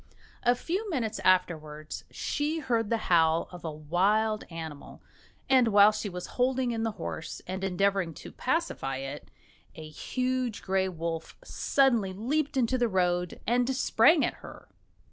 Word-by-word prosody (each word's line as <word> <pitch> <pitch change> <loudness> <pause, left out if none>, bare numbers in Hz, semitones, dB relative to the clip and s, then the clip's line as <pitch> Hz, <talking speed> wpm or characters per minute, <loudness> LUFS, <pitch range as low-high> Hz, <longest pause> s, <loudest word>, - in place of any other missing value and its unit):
A 245 0 +3
few 380 - -3
minutes 240 - -2
afterwards 155 -5 0
she 300 +2 -2
heard 230 -8 0
the 230 - +2
howl 165 -1 +3
of 180 -1 -10
a 165 - -3
wild 195 +8 +1
animal, 160 -4 -8 0.5
and, 260 -3 +5
while 205 -1 +7
she 215 -1 -4
was 180 -1 -6 0.2
holding 255 -1 +2
in 225 -1 -2
the 225 -1 -1
horse 160 - -6
and 190 +1 -5
endeavouring 195 -3 0
to - - -10
pacify 255 - -2
it, 135 +2 -7 0.5
a 155 -1 -8
huge 255 - -2
grey 190 0 +1
wolf 165 -2 -5
suddenly 240 - +2
leaped 275 +8 -1
into 255 0 +2
the 240 - +3
road 180 -2 0
and 245 +2 +2
sprang 275 +4 +4
at - - -2
her. - - -12
205 Hz, 150 wpm, -28 LUFS, 170-250 Hz, 0.5 s, while